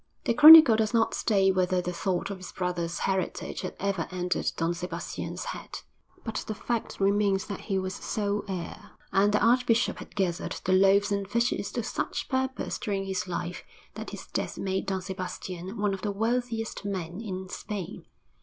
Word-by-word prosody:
VII - - -46 0.2
The - - +1
chronicle 305 -2 +11
does 220 +1 0
not 225 -1 +2
state 195 -3 +3
whether 185 0 +1
the 180 0 -3
thought 180 +2 -2
of 195 - -6
his 185 - -9
brother's 175 -2 -2
heritage 190 -1 -2
had 185 - -5
ever 195 -4 -1
entered 180 0 -1
Don 165 +1 0
Sebastian's 180 +1 -5
head; - - -8 0.4
but 225 -2 -4
the 215 - -3
fact 235 +2 -3
remains 200 0 +2
that 200 -3 -5
he 195 - +1
was 185 0 -2
sole 205 0 -2
heir, 185 -3 -6 0.2
and 200 +2 +3
the 210 - +2
archbishop 235 -1 +3
had - - -11
gathered 185 -2 -1
the 185 - +2
loaves 195 +2 +4
and 200 -1 -1
fishes 235 -2 0
to 240 - -2
such 245 +2 -3
purpose 260 0 -2
during 195 -3 -2
his 190 -1 -3
life 175 0 -4 0.3
that - - -7
his - - -8
death - - -4
made 190 0 -2
Don 190 -1 -2
Sebastian 185 +1 -6
one 205 -1 0
of 190 - -5
the 210 - -2
wealthiest 225 +1 -2
men 185 -1 -4
in 190 -4 -5
Spain. 200 0 -6
195 Hz, 180 wpm, -28 LUFS, 185-220 Hz, 0.4 s, chronicle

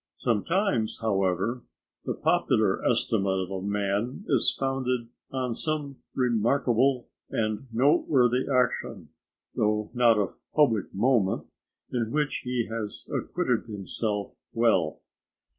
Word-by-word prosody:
Sometimes, 120 - 0
however, 100 +2 0 0.4
the - - -2
popular - - +2
estimate 95 -3 +1
of 95 0 -4
a 95 -1 -3
man 105 - -1
is - - +4
founded 130 -3 -1 0.2
on 130 -2 -1
some 145 0 -3 0.2
remarkable 125 +1 +2 0.2
and 110 +4 -2
noteworthy 130 -1 +3
action, 125 -1 0 0.4
though 105 0 0
not 120 -3 +4
of 100 -3 -2
public 115 -10 +3
moment, 110 -2 +1 0.5
in 115 -3 -1
which 150 +3 0
he 125 -2 -1
has 110 -2 -5
acquitted - - -1
himself 105 0 -3 0.2
well. 100 -10 +2
115 Hz, 110 wpm, -27 LUFS, 105-130 Hz, 0.5 s, is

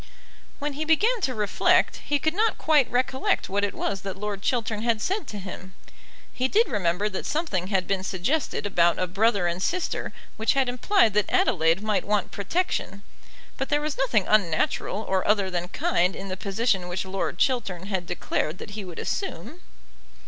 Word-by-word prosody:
When 295 0 -3
he 300 +3 -3
began 420 +10 +2
to 260 -8 0
reflect, 210 -2 +2
he 290 - -1
could 315 +2 0
not 435 +4 +1
quite 300 -5 +3
recollect 260 +2 0
what 200 +1 0
it 205 - -1
was 195 -1 -2
that 195 -1 -5
Lord 205 -1 -4
Chiltern 220 -2 -1
had 230 -1 +1
said 385 - -2
to 210 - -6
him. 185 -1 -8 0.6
He 255 - 0
did 450 - +3
remember 190 0 0
that 190 - -4
something 295 - -1
had 190 -2 0
been 195 -1 -1
suggested 195 - -1
about 175 -4 +3
a 185 - +1
brother 200 +1 +2
and 175 +1 -1
sister 360 - -1 0.3
which 220 0 +2
had 270 -2 +2
implied 250 - +3
that 210 -1 +1
Adelaide 165 +3 +2
might 215 -2 +1
want 205 -2 0
protection, 200 - -2 0.5
but 270 - -3
there 295 - +3
was 300 -1 -2
nothing 235 -7 +1
unnatural 205 +1 +1
or 190 -1 +1
other 200 -3 +2
than 175 0 -2
kind 180 0 +1
in 195 0 -7
the 185 - -2
position 195 -1 0
which 180 +2 -3
Lord 190 -2 -3
Chiltern 195 -8 0
had 190 -3 -3
declared 155 +4 -2
that 205 - -9
he 210 0 -5
would 180 -3 -9
assume. 315 - -4
205 Hz, 185 wpm, -25 LUFS, 185-265 Hz, 0.6 s, quite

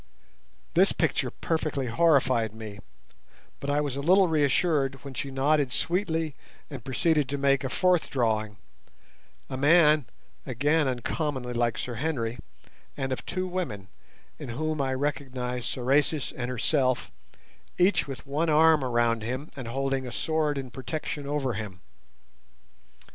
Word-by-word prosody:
This - - +4
picture - - 0
perfectly 155 -4 -2
horrified 130 -5 +2
me, 110 -2 -8 0.8
but 140 - -4
I 145 +1 +2
was 145 -3 -2
a 140 - -3
little 185 +5 +5
reassured 145 -2 +2
when 140 -2 -8
she 135 +2 -4
nodded 135 0 +2
sweetly 165 -1 0 0.4
and 135 -5 -7
proceeded 150 +1 +1
to 140 - -1
make 140 -1 +2
a 135 - -2
fourth 180 +3 +2
drawing—a 110 - -5
man 150 -1 +5 0.4
again 145 - +1
uncommonly 130 0 -2
like 120 -1 0
Sir 125 - -4
Henry, 125 -6 -2 0.6
and 135 -2 -1
of - - -5
two 185 +1 -2
women, 150 - -4 0.5
in - - -7
whom 155 +4 -2
I 130 -1 0
recognized 130 -3 -3
Sorais 140 +3 +1
and 125 -1 -3
herself, 130 +1 +1 0.7
each 180 -1 +3
with 135 -2 -7
one 150 +4 0
arm 155 -1 +5
around 120 -2 +1
him, 130 +7 -4
and 130 -5 -6
holding 135 +1 -1
a - - -6
sword 150 +6 0
in 130 -2 -5
protection 145 +2 -5
over 140 -3 -1
him. 105 -4 -6
135 Hz, 135 wpm, -27 LUFS, 125-155 Hz, 0.8 s, little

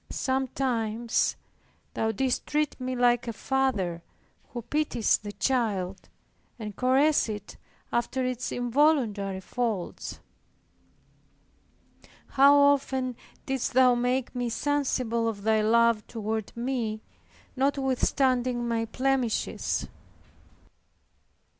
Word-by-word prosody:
Sometimes 245 -4 0 0.6
Thou 220 0 0
didst 255 +4 -1
treat 300 -2 -1
me 255 0 -2
like 245 -1 +2
a 230 - -2
father 220 -10 -1 0.5
who 240 -2 -6
pities 270 -3 +1
the 205 0 -7
child, 200 -4 -1 0.5
and 210 -3 -7
caresses 265 +2 +3
it 210 -1 -7 0.4
after 255 +2 0
its 255 0 -3
involuntary 245 -7 +1
faults. 215 -2 -3 2.1
How 280 +1 +6
often 270 -3 +2 0.3
didst 265 -2 -2
Thou 255 0 +6
make 245 +1 0
me 245 -1 -2
sensible 250 -4 0
of 205 -3 -4
Thy 220 0 +3
love 230 0 +3
toward 220 -1 -3
me, 235 -3 -2 0.5
notwithstanding 260 -2 +1
my 230 -1 0
blemishes! 255 0 -1
245 Hz, 95 wpm, -27 LUFS, 220-265 Hz, 2.1 s, How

